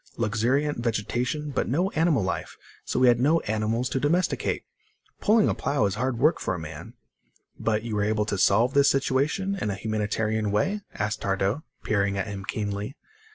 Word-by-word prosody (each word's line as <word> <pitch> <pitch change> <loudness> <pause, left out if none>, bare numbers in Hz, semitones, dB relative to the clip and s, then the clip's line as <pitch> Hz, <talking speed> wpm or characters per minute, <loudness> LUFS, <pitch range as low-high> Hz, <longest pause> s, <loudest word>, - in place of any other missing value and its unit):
Luxuriant 120 +6 +1
vegetation, 120 +6 -1
but - - -1
no 175 +9 +1
animal 160 - +2
life, 95 - -3 0.3
so - - -2
we 130 - +5
had 120 -1 +5
no 155 +6 +4
animals 110 +3 -1
to 135 - -1
domesticate. 170 +7 0 0.6
Pulling 215 0 +4
a - - +2
plow 140 -7 0
is 100 - 0
hard 120 +2 -1
work 150 +7 +3
for 95 - -1
a - - -5
man." 80 -2 -9 0.6
"But 110 -1 0
you 115 -2 -3
were 105 - +1
able 105 0 +1
to 105 -2 -2
solve 115 +8 +4
this 140 0 +5
situation 140 +8 +1
in - - -1
a 100 - -1
humanitarian 110 +1 -1
way?" 190 - 0
asked 105 +1 -2
Tardo, 100 +5 0 0.2
peering 100 -2 +1
at 95 - -1
him 100 -2 -6
keenly. 105 +5 -3
115 Hz, 180 wpm, -26 LUFS, 105-140 Hz, 0.6 s, we